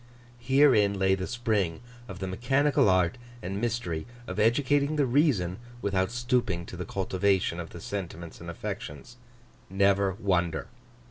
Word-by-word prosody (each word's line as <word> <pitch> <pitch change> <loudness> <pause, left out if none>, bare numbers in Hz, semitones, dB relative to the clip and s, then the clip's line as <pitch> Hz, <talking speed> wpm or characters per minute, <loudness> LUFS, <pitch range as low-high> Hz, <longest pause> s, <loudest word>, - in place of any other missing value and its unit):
Herein 120 -5 +4
lay 95 0 +3
the 95 -1 -2
spring 110 -9 -1 0.3
of 95 - -8
the 95 - -4
mechanical 125 +6 +2
art 95 +4 +2 0.2
and 95 +3 -3
mystery 110 -9 -2 0.2
of - - -5
educating 140 +6 +2
the 145 -2 +2
reason 120 - +2 0.2
without 95 -4 0
stooping 120 -7 0
to - - -9
the 90 0 -5
cultivation 95 -1 0
of 85 -2 -6
the 85 - -10
sentiments 85 -3 -6
and 85 - -7
affections. 80 - -7 0.5
Never 100 0 +2
wonder. 90 -6 0
100 Hz, 140 wpm, -28 LUFS, 90-120 Hz, 0.5 s, Herein